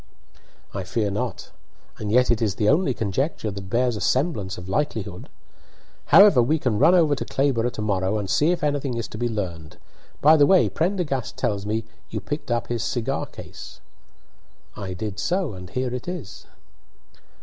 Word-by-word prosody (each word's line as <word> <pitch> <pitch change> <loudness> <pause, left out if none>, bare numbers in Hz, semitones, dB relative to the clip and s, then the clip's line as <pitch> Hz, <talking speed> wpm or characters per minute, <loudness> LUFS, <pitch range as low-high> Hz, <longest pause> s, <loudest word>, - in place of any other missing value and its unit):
"I 100 - -3
fear 100 +3 -1
not; 115 +1 -4 0.5
and 105 -1 -3
yet 125 +1 +4
it 120 - +1
is 105 -4 0
the 105 - 0
only 150 - +3
conjecture 110 - -2
that 95 -1 -8
bears 120 +2 +1
a 105 - -5
semblance 130 - 0
of 90 - -8
likelihood. 100 -5 -3 0.8
However 200 -11 +7
we 145 +7 +2
can 120 -8 -1
run 175 +3 +6
over 160 -5 +4
to 140 - -2
Clayborough 130 -4 +1
to 110 - -4
morrow 100 0 0
and 100 -2 -3
see 145 - +2
if 175 -3 0
anything 145 -4 -1
is 115 - -3
to 110 - -8
be 120 0 0
learned. 85 -8 -5 0.4
By 155 +2 +6
the 145 -1 +5
way 190 -2 +5
Prendergast 165 - -2
tells 100 -2 -1
me 110 +2 -1 0.3
you 110 - -3
picked 145 +8 -5
up 120 0 0
his 120 -2 -2
cigar 130 +3 -2
case." - - -11 1.0
"I 95 -2 -5
did 105 0 -5
so, 180 - -1
and 90 -1 -9
here 125 +5 -2
it 125 +4 -5
is." 175 - -7
120 Hz, 180 wpm, -24 LUFS, 105-145 Hz, 1.0 s, However